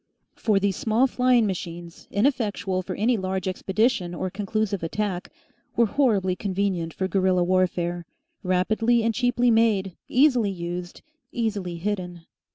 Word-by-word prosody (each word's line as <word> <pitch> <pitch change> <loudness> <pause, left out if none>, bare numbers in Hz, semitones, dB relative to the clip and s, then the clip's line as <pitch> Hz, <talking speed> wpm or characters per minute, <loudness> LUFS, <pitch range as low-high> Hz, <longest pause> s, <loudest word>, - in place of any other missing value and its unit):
For 210 -3 +2
these 195 -1 0
small 225 +4 +2
flying 250 -2 +3
machines, 170 -3 -6
ineffectual 205 -5 0
for 185 0 -5
any 230 +3 +2
large 190 -1 -2
expedition 190 -1 0
or 185 +2 -3
conclusive 205 0 -2
attack, 185 +2 -3 0.5
were 235 - +4
horribly 205 -7 +1
convenient 190 -3 -1
for 190 +3 -2
guerilla 185 -2 +2
warfare, 175 -1 0 0.3
rapidly 220 +6 +2
and 230 0 +1
cheaply 245 0 +2
made, 210 -5 +2
easily 250 -5 +4
used, 175 -1 -6 0.3
easily 205 -7 -2
hidden. 180 -2 -4
195 Hz, 130 wpm, -25 LUFS, 180-225 Hz, 0.5 s, were